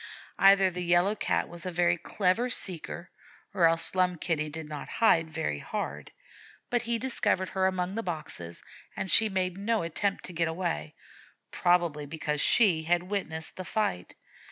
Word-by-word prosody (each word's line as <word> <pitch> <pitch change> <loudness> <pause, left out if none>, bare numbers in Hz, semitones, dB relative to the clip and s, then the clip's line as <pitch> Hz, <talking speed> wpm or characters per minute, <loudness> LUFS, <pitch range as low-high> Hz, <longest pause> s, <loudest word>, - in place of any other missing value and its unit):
Either 195 -1 +6
the 180 0 -5
Yellow 175 +3 +3
Cat 215 - -1
was 170 -1 -8
a 185 - -3
very 175 0 +2
clever 190 +7 0
seeker, 175 -5 -4 0.4
or 180 -4 +5
else 165 0 +3
Slum 185 -1 +2
Kitty 155 -2 -1
did 155 +1 -7
not 150 -1 -7
hide 165 -8 +3
very 115 - -3
hard; - - -5 0.6
but 240 -1 +2
he 235 0 -1
discovered 225 -6 0
her 190 0 +1
among 185 0 -2
the 225 - -2
boxes, 155 - -5 0.3
and 190 - -3
she 220 -1 +5
made 185 -1 -2
no 220 -1 0
attempt 195 +4 -2
to 180 - -7
get 165 0 +1
away, 160 - -3 0.6
probably 170 -4 +1
because 150 -1 -2
she 190 -9 +4
had 175 +3 0
witnessed 160 -6 -4
the 185 - -4
fight. 175 - -2
180 Hz, 165 wpm, -28 LUFS, 160-195 Hz, 0.6 s, Either